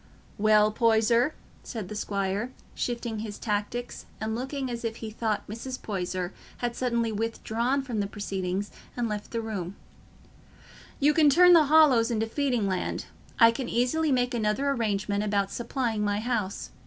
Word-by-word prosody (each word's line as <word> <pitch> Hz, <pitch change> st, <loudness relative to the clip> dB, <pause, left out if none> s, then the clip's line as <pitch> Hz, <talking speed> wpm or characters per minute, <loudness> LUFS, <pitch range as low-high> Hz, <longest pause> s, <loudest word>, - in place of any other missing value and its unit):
"Well, 215 Hz, 0 st, +5 dB
Poyser," 230 Hz, +4 st, +3 dB, 0.3 s
said 220 Hz, -7 st, -6 dB
the 210 Hz, -, -7 dB
squire, 200 Hz, +3 st, -2 dB, 0.2 s
shifting 235 Hz, -2 st, -3 dB
his 210 Hz, -1 st, -5 dB
tactics 215 Hz, +3 st, -3 dB
and 220 Hz, 0 st, -2 dB
looking 265 Hz, +3 st, -3 dB
as 235 Hz, 0 st, -5 dB
if 225 Hz, -1 st, -2 dB
he 220 Hz, -1 st, -7 dB
thought 220 Hz, -1 st, -2 dB
Mrs. 255 Hz, +5 st, -6 dB
Poyser 185 Hz, -2 st, -3 dB, 0.2 s
had 240 Hz, -1 st, -2 dB
suddenly 235 Hz, -2 st, 0 dB
withdrawn 230 Hz, +4 st, -1 dB
from 240 Hz, -5 st, -3 dB
the 200 Hz, -, 0 dB
proceedings 195 Hz, -1 st, -3 dB, 0.3 s
and 240 Hz, -1 st, 0 dB
left 210 Hz, -1 st, -4 dB
the 230 Hz, -, -2 dB
room, 200 Hz, -4 st, -4 dB, 1.2 s
"you 295 Hz, +2 st, +4 dB
can 300 Hz, -1 st, +5 dB
turn 360 Hz, +5 st, +7 dB
the 325 Hz, -3 st, +7 dB
Hollows 280 Hz, -6 st, +5 dB
into 225 Hz, -2 st, 0 dB
feeding 245 Hz, -3 st, 0 dB
land. 185 Hz, -1 st, -2 dB, 0.3 s
I 230 Hz, -1 st, +8 dB
can 245 Hz, +2 st, -4 dB
easily 280 Hz, +6 st, +1 dB
make 250 Hz, -1 st, +1 dB
another 235 Hz, +5 st, +1 dB
arrangement 205 Hz, -4 st, 0 dB
about 200 Hz, -2 st, 0 dB
supplying 235 Hz, -3 st, -2 dB
my 205 Hz, 0 st, 0 dB
house. 220 Hz, -4 st, -2 dB
225 Hz, 155 wpm, -27 LUFS, 210-245 Hz, 1.2 s, I